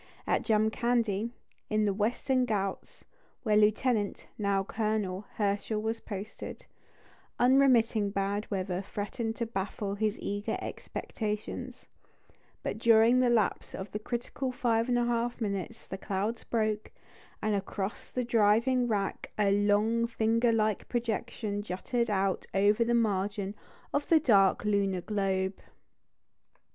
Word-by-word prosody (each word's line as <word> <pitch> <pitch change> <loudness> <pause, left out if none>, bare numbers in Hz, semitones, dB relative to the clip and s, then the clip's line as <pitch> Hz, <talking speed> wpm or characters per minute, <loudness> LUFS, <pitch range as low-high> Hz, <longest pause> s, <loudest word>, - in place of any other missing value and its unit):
At - - +1
Jamkandi, 220 0 +1 0.4
in 215 0 +2
the 200 - +2
Western 245 +5 +1
Ghauts, 195 -3 -3 0.4
where 215 -3 +2
Lieutenant 215 0 +2
(now 200 -2 +1
Colonel) 210 -2 -2
Herschel 205 +1 0
was 225 +1 -2
posted, 205 +1 -7 0.7
unremitting 245 -5 +4
bad 200 +1 -2
weather 185 -2 -2
threatened 215 +3 -4
to 235 - -2
baffle 200 -1 -3
his 215 +1 0
eager 205 +1 -2
expectations; 210 -1 -5 0.8
but - - -3
during 230 +1 +6
the 250 -1 +4
lapse 230 -4 +1
of 190 - -6
the 210 - -3
critical 245 +3 -3
five 235 -1 +1
and 245 - +3
a 240 - +2
half 240 0 -1
minutes 210 +1 -3
the 190 - -6
clouds 205 +4 -2
broke, 215 -2 -1 0.5
and 215 - 0
across 195 0 -3
the 250 - -2
driving 235 +2 +3
wrack 205 -4 -2
a 205 -2 +3
"long, 210 +3 +3
finger 230 +1 +2
like 215 -2 0
projection" 230 -3 -2
jutted 220 +5 -2
out 195 -2 0
over 205 +4 +4
the 240 +1 +1
margin 200 -2 0 0.4
of 290 - -1
the 325 - +6
dark 200 -9 +4
lunar 200 -3 +1
globe. 190 -1 -1
215 Hz, 130 wpm, -30 LUFS, 200-235 Hz, 0.8 s, during